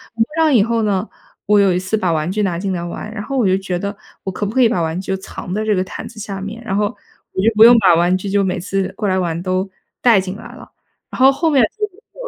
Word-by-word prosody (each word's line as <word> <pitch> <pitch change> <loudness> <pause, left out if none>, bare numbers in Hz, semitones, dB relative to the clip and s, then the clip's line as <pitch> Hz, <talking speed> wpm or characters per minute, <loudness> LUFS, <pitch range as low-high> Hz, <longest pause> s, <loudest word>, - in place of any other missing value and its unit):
我 225 - -2
铺 225 - +3
上 320 -2 +3
以 215 - +5
后 230 0 0
呢， 200 0 0 0.4
我 210 0 +4
有 195 -2 +4
一 - - +1
次 185 +4 -1
把 180 -5 0
玩 155 +2 -1
具 210 +2 -1
拿 185 -4 0
进 190 +2 -2
来 180 -2 -2
玩， 175 +5 -6
然 215 - -5
后 275 +6 -4
我 245 - +2
就 190 0 +3
觉 190 -2 -3
得， 200 +3 -4 0.3
我 190 - -3
可 205 - -3
不 205 - -4
可 260 - +4
以 235 - +5
把 185 -7 0
玩 160 +1 -2
具 190 - -8
就 - - -5
藏 190 -1 -8
在 215 +2 -2
这 215 -1 +2
个 185 - +1
毯 185 - -8
子 225 - -14
下 200 -2 -5
面， 210 +4 -7
然 195 -4 -3
后 210 +1 +2 0.5
我 - - -1
就 225 - +4
不 220 +1 +8
用 240 0 +8
把 190 -5 +5
玩 175 +2 +3
具 185 +2 -4
就 200 0 +2
每 185 - -1
次 195 +1 -2
过 210 -2 -1
来 190 0 +1
玩 170 -2 -2
都 185 +1 -1 0.3
带 230 -6 +5
进 185 +1 -6
来 - - -11
了。 - - -14 0.4
然 - - -8
后 260 +1 +7
后 325 +4 0
面 275 -3 +4 0.2
就 425 - -5
又 420 +4 -16
200 Hz, 325 characters per minute, -18 LUFS, 185-225 Hz, 0.5 s, 不